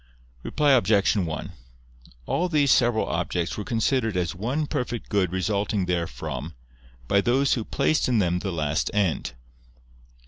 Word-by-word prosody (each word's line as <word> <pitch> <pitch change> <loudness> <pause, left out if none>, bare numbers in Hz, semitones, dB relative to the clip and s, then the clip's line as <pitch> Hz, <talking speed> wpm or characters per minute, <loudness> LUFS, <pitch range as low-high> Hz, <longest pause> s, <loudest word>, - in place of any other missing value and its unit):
Reply 150 - +1
Obj. 110 -6 +3
1: 85 -7 -3 0.7
All 180 - 0
these 145 -5 +3
several 120 -3 +3
objects 85 -1 -2
were 105 - -4
considered 115 -1 0
as 90 -2 -1
one 125 - -2
perfect 120 -4 -4
good 95 -4 +1
resulting 100 +1 -1
therefrom, 85 -2 -3 0.5
by 100 +6 +3
those 130 +5 +2
who 115 - -1
placed 145 +6 +1
in 120 - +2
them 90 -3 +1
the 95 +1 -3
last 75 -2 -1
end. 95 -11 0
105 Hz, 140 wpm, -25 LUFS, 90-125 Hz, 0.7 s, Obj